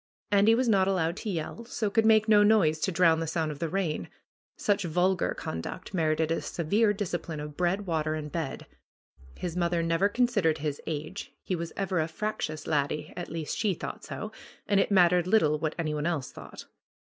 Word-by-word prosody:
Andy 205 Hz, +3 st, +5 dB
was 255 Hz, +1 st, +1 dB
not 195 Hz, -4 st, +4 dB
allowed 175 Hz, -3 st, +1 dB
to 220 Hz, -, -4 dB
yell, 180 Hz, +5 st, -4 dB
so 220 Hz, -3 st, -2 dB
could 220 Hz, +1 st, +3 dB
make 215 Hz, -1 st, +5 dB
no 210 Hz, -1 st, +6 dB
noise 205 Hz, -7 st, +4 dB
to 190 Hz, -, 0 dB
drown 165 Hz, -2 st, +4 dB
the 165 Hz, -, -2 dB
sound 160 Hz, -1 st, -1 dB
of 145 Hz, -, -8 dB
the 165 Hz, -, -2 dB
rain. 175 Hz, -3 st, -2 dB, 0.5 s
Such 205 Hz, -1 st, +1 dB
vulgar 180 Hz, +2 st, +1 dB
conduct 80 Hz, -, -6 dB
merited 160 Hz, -2 st, +1 dB
a 165 Hz, -, 0 dB
severe 205 Hz, +6 st, +1 dB
discipline 175 Hz, -6 st, -3 dB
of 150 Hz, 0 st, -7 dB
bread, 180 Hz, +4 st, 0 dB
water 155 Hz, -3 st, -1 dB
and 150 Hz, -1 st, -5 dB
bed. 160 Hz, -6 st, -4 dB, 0.7 s
His 175 Hz, -2 st, -4 dB
mother 170 Hz, -1 st, +1 dB
never 165 Hz, +4 st, +2 dB
considered 205 Hz, -8 st, +2 dB
his 145 Hz, -1 st, -3 dB
age. 155 Hz, +5 st, -5 dB
He 185 Hz, -, -1 dB
was 170 Hz, -1 st, -5 dB
ever 190 Hz, -3 st, 0 dB
a 155 Hz, -, +1 dB
frac 210 Hz, +6 st, -3 dB
tious 155 Hz, -1 st, -4 dB
laddie, 150 Hz, 0 st, -1 dB
at 175 Hz, -, -5 dB
least 160 Hz, -1 st, -4 dB
she 210 Hz, -5 st, 0 dB
thought -, -, -7 dB
so, -, -, -6 dB, 0.4 s
and 200 Hz, -1 st, +3 dB
it -, -, +2 dB
mattered 180 Hz, -2 st, +4 dB
little 155 Hz, -8 st, +3 dB
what 155 Hz, 0 st, -2 dB
any 160 Hz, -3 st, -1 dB
one 150 Hz, +1 st, -1 dB
else 155 Hz, -7 st, -2 dB
thought. -, -, -10 dB
170 Hz, 200 wpm, -28 LUFS, 155-200 Hz, 0.7 s, no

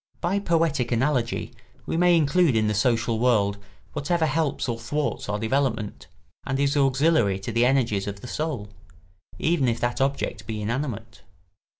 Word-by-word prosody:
By 180 Hz, +4 st, 0 dB
poetic 165 Hz, -9 st, +1 dB
analogy 120 Hz, -1 st, 0 dB, 0.3 s
we -, -, -2 dB
may 175 Hz, 0 st, +5 dB
include 160 Hz, -2 st, +3 dB
in 110 Hz, -1 st, +2 dB
the 105 Hz, -, +1 dB
social 115 Hz, 0 st, +1 dB
world 105 Hz, -5 st, +2 dB, 0.3 s
whatever 160 Hz, +3 st, 0 dB
helps 150 Hz, -1 st, 0 dB
or 115 Hz, -2 st, -2 dB
thwarts 145 Hz, 0 st, -3 dB
our 105 Hz, -, 0 dB
development, 110 Hz, -1 st, -1 dB, 0.4 s
and 135 Hz, +1 st, -2 dB
is 140 Hz, +1 st, +1 dB
auxiliary 135 Hz, -, +3 dB
to 95 Hz, +4 st, -5 dB
the 115 Hz, +2 st, +3 dB
energies 115 Hz, -7 st, +1 dB
of 100 Hz, 0 st, -6 dB
the -, -, -8 dB
soul, 130 Hz, -9 st, -3 dB, 0.7 s
even 160 Hz, -5 st, +1 dB
if 115 Hz, -1 st, 0 dB
that 120 Hz, +2 st, -1 dB
object 140 Hz, +1 st, -1 dB
be 110 Hz, -1 st, -4 dB
inanimate. 115 Hz, 0 st, -4 dB
130 Hz, 160 wpm, -25 LUFS, 110-150 Hz, 0.7 s, may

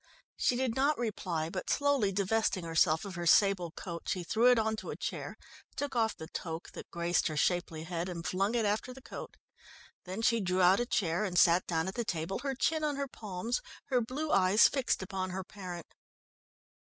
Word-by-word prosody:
She 250 Hz, -, +2 dB
did 255 Hz, -2 st, 0 dB
not 285 Hz, +3 st, +2 dB
reply, 180 Hz, -8 st, -2 dB
but 185 Hz, -, -4 dB
slowly 285 Hz, -8 st, +2 dB
divesting 200 Hz, 0 st, +1 dB
herself 165 Hz, +1 st, +2 dB
of 195 Hz, -, -6 dB
her 175 Hz, -1 st, -3 dB
sable 195 Hz, -3 st, +4 dB
coat 170 Hz, 0 st, -7 dB
she 180 Hz, -, -1 dB
threw 225 Hz, +8 st, +3 dB
it 250 Hz, -, +5 dB
on 220 Hz, 0 st, +1 dB
to -, -, -7 dB
a -, -, -4 dB
chair, -, -, -5 dB, 0.4 s
took 285 Hz, -2 st, -3 dB
off 225 Hz, -2 st, +1 dB
the 160 Hz, -, -7 dB
toque 160 Hz, +1 st, -6 dB
that -, -, -9 dB
graced 170 Hz, 0 st, +1 dB
her 155 Hz, -2 st, -3 dB
shapely 170 Hz, -1 st, 0 dB
head, 170 Hz, +1 st, -3 dB
and 170 Hz, -1 st, -6 dB
flung 195 Hz, +7 st, 0 dB
it 230 Hz, -2 st, +2 dB
after 215 Hz, +5 st, -1 dB
the 265 Hz, -, -12 dB
coat. -, -, -8 dB, 0.7 s
Then 190 Hz, +5 st, -5 dB
she 230 Hz, 0 st, +3 dB
drew 185 Hz, -1 st, 0 dB
out 185 Hz, +4 st, +6 dB
a 240 Hz, -, -1 dB
chair, 175 Hz, -5 st, 0 dB
and 185 Hz, -4 st, -2 dB
sat 175 Hz, +1 st, +5 dB
down 165 Hz, 0 st, 0 dB
at 190 Hz, -, -3 dB
the 240 Hz, -, -2 dB
table, 175 Hz, -2 st, -3 dB
her 275 Hz, -1 st, -2 dB
chin 310 Hz, +4 st, +1 dB
on 295 Hz, -1 st, 0 dB
her 280 Hz, 0 st, -2 dB
palms, 215 Hz, -, -3 dB, 0.3 s
her 250 Hz, -3 st, +3 dB
blue 280 Hz, +7 st, -3 dB
eyes 195 Hz, +3 st, +6 dB
fixed 265 Hz, -7 st, 0 dB
upon 190 Hz, -1 st, -3 dB
her 190 Hz, +1 st, -4 dB
parent. 180 Hz, -4 st, -8 dB
195 Hz, 205 wpm, -31 LUFS, 175-235 Hz, 0.7 s, out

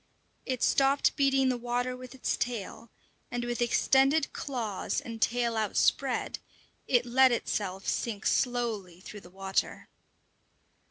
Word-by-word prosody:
It 255 Hz, -2 st, -2 dB
stopped 275 Hz, +1 st, +3 dB
beating 270 Hz, -2 st, +3 dB
the 250 Hz, -1 st, -1 dB
water 245 Hz, +1 st, -2 dB
with 255 Hz, +1 st, -10 dB
its 260 Hz, -, -1 dB
tail, 230 Hz, -1 st, -4 dB, 0.4 s
and 245 Hz, -1 st, -3 dB
with 240 Hz, 0 st, -3 dB
extended 270 Hz, +5 st, +3 dB
claws 230 Hz, -8 st, -3 dB
and 230 Hz, -1 st, -8 dB
tail 235 Hz, -1 st, +1 dB
outspread, 215 Hz, -2 st, 0 dB, 0.5 s
it 245 Hz, -1 st, +3 dB
let 260 Hz, +2 st, +5 dB
itself 195 Hz, -5 st, -2 dB
sink 215 Hz, -3 st, -2 dB
slowly 225 Hz, -8 st, 0 dB
through 205 Hz, +2 st, -10 dB
the 175 Hz, -, -14 dB
water. 195 Hz, +1 st, -2 dB
240 Hz, 125 wpm, -29 LUFS, 215-255 Hz, 0.5 s, let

